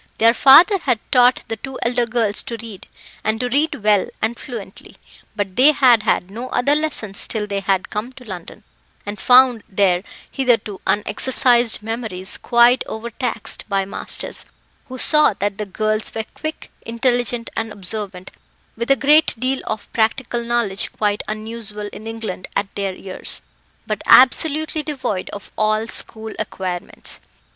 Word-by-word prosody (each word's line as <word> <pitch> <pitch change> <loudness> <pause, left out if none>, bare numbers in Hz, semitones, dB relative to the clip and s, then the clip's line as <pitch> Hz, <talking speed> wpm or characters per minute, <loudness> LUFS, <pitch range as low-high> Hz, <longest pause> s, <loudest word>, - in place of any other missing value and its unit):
Their 230 +1 +5
father 335 - +7
had 250 -8 0
taught 250 0 +4
the 225 -1 -4
two 265 +4 -8
elder 240 0 0
girls 225 -3 0
to 230 - -6
read, 220 -4 -10 0.4
and 220 +1 -1
to 250 0 -1
read 285 -3 0
well 210 -2 +3
and 225 +2 -1
fluently; 225 -7 -9 0.4
but 200 -3 -3
they 280 +4 +7
had 250 -6 +5
had 195 -3 0
no 240 +5 -6
other 280 +3 +1
lessons 295 -10 +1
till 215 -2 -2
they 200 -1 -3
had 195 -1 -1
come 215 +4 -4
to 255 - -14
London, 185 -6 -9 0.4
and 205 0 -6
found 250 -1 +5
their 190 -3 +2 0.3
hitherto 230 -7 0
unexercised 240 +1 +3
memories 220 -4 -4
quite 240 +1 +4
overtaxed 230 0 -3
by 195 -1 0
masters, 195 - -2 0.4
who 260 - -8
saw 300 -4 +4
that 200 +1 -3
the 210 - -3
girls 215 +2 -2
were 220 -1 -3
quick, 310 0 -7
intelligent, 240 0 -1
and 225 -1 -2
observant, 195 -2 -6 0.4
with 235 +2 -4
a 275 - +6
great 295 +5 +4
deal 260 +2 -1
of 215 -1 -5
practical 235 +1 0
knowledge 235 -4 0
quite 205 -1 0
unusual 215 -1 -6
in 220 - -9
England 225 -5 -6
at 200 0 -2
their 195 -2 -3
years, 185 0 -5 0.4
but - - -3
absolutely 310 +4 +5
devoid 260 -11 -4
of 200 - -9
all 215 +1 +1
school 220 -1 -2
acquirements. 185 -3 -5
225 Hz, 150 wpm, -20 LUFS, 205-250 Hz, 0.4 s, father